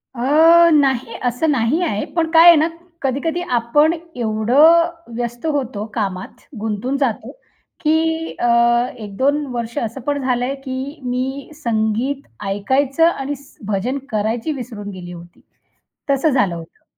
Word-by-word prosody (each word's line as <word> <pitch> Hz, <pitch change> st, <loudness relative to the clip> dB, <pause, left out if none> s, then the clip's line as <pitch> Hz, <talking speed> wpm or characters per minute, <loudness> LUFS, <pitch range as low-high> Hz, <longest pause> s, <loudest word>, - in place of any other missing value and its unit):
अ, 320 Hz, +7 st, +5 dB
नाही, 265 Hz, -5 st, +2 dB
असं 250 Hz, +6 st, +1 dB
नाही 265 Hz, +5 st, +1 dB
आहे. 210 Hz, -12 st, -1 dB
पण 330 Hz, -1 st, -1 dB
काय 330 Hz, +1 st, +7 dB
आहे 345 Hz, -, +10 dB
ना 310 Hz, +1 st, +3 dB, 0.3 s
कधी-कधी 290 Hz, +6 st, -1 dB, 0.2 s
आपण 295 Hz, +7 st, +3 dB, 0.2 s
एवढं 250 Hz, +10 st, +4 dB, 0.3 s
व्यस्त 240 Hz, +2 st, -4 dB
होतो 260 Hz, -9 st, -2 dB
कामात, 195 Hz, -5 st, -4 dB, 0.2 s
गुंतून 220 Hz, +5 st, -2 dB
जातो 265 Hz, -6 st, -2 dB, 0.5 s
की 320 Hz, +1 st, 0 dB
अ, -, -, 0 dB, 0.5 s
1-2 260 Hz, +8 st, -1 dB
वर्ष 235 Hz, -1 st, -4 dB
असं 230 Hz, +4 st, -3 dB
पण 285 Hz, +3 st, -2 dB
झालंय, 250 Hz, 0 st, 0 dB
की 270 Hz, +2 st, -6 dB
मी 260 Hz, +2 st, -3 dB
संगीत 235 Hz, +1 st, -1 dB, 0.2 s
ऐकायचं 265 Hz, +10 st, 0 dB
आणि 285 Hz, -3 st, -4 dB
स् 280 Hz, 0 st, -19 dB
भजन 210 Hz, +6 st, -1 dB
करायची 225 Hz, +6 st, -1 dB
विसरून 230 Hz, -6 st, -7 dB
गेली 180 Hz, -2 st, -9 dB
होती, 170 Hz, 0 st, -13 dB, 0.7 s
तसं 275 Hz, +3 st, +2 dB
झालं 205 Hz, -, +1 dB
होतं. 165 Hz, -1 st, -12 dB
260 Hz, 135 wpm, -19 LUFS, 225-295 Hz, 0.7 s, आहे